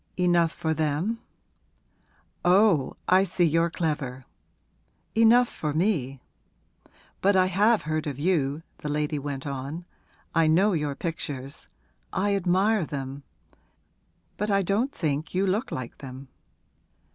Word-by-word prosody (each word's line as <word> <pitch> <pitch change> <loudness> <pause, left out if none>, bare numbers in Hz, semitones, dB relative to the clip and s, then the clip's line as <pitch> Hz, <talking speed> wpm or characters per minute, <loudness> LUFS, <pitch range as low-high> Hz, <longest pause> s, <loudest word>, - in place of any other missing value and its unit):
'Enough 175 -2 +3
for 160 -1 -2
them?' 160 +9 -1 1.2
'Oh, 180 -6 +4
I 185 +1 +5
see 185 -1 0
you're 165 +1 +2
clever. 145 -7 -3 0.9
Enough 230 +2 +5
for 150 -8 -4
me! 155 -8 0 1.0
But 200 +1 +4
I 185 -1 +5
have 205 +5 +3
heard 155 0 -2
of 140 -3 -4
you,' 150 -2 0 0.2
the 150 - -5
lady 150 0 -1
went 140 -1 -5
on. 140 +5 -5 0.5
'I 165 -1 +4
know 190 +6 +4
your 150 -4 -1
pictures; 140 -4 -5 0.4
I 200 +1 +1
admire 195 +2 +2
them. 140 -2 -5 1.2
But 210 +1 -1
I 200 -1 +3
don't 210 +9 0
think 155 - -2
you 190 +2 +2
look 205 +7 -1
like 130 -2 -6
them.' 130 0 -9
165 Hz, 125 wpm, -26 LUFS, 145-195 Hz, 1.2 s, I